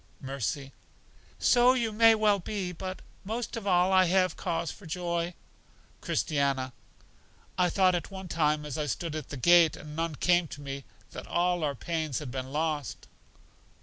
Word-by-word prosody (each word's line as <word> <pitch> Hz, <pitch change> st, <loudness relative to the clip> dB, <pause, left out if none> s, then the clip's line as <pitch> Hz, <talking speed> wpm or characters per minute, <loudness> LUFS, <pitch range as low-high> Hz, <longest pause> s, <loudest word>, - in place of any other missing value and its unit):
Mercy: 135 Hz, +1 st, -4 dB, 0.6 s
So 245 Hz, 0 st, +5 dB
you 235 Hz, -4 st, 0 dB
may 225 Hz, +1 st, +6 dB
well 210 Hz, -2 st, +3 dB
be; 190 Hz, 0 st, -4 dB
but 185 Hz, +2 st, -6 dB, 0.2 s
most 225 Hz, +5 st, -4 dB
of 220 Hz, -3 st, -5 dB
all 185 Hz, 0 st, +4 dB
have 185 Hz, 0 st, +4 dB
I -, -, -14 dB
cause 165 Hz, -2 st, -2 dB
for 195 Hz, -, -12 dB
joy. 170 Hz, 0 st, -2 dB, 0.7 s
Christiana: 140 Hz, -3 st, 0 dB, 0.8 s
I 180 Hz, -1 st, +2 dB
thought 185 Hz, +1 st, +3 dB
at 175 Hz, -, -2 dB
one 190 Hz, -1 st, -8 dB
time 150 Hz, -2 st, +1 dB
as 150 Hz, +1 st, -4 dB
I 150 Hz, -, -1 dB
stood 160 Hz, +3 st, -3 dB
at 155 Hz, -4 st, -5 dB
the 140 Hz, -, -6 dB
gate, 170 Hz, +3 st, +5 dB
and 150 Hz, 0 st, -10 dB
none 165 Hz, -1 st, -2 dB
came 175 Hz, +3 st, +2 dB
to 145 Hz, -, -9 dB
me, 140 Hz, -1 st, -6 dB, 0.3 s
that -, -, -8 dB
all 175 Hz, -1 st, +1 dB
our 145 Hz, -2 st, 0 dB
pains 160 Hz, -1 st, -2 dB
had 145 Hz, -5 st, -5 dB
been 130 Hz, 0 st, -5 dB
lost. 150 Hz, -3 st, -2 dB
170 Hz, 170 wpm, -29 LUFS, 150-185 Hz, 0.8 s, may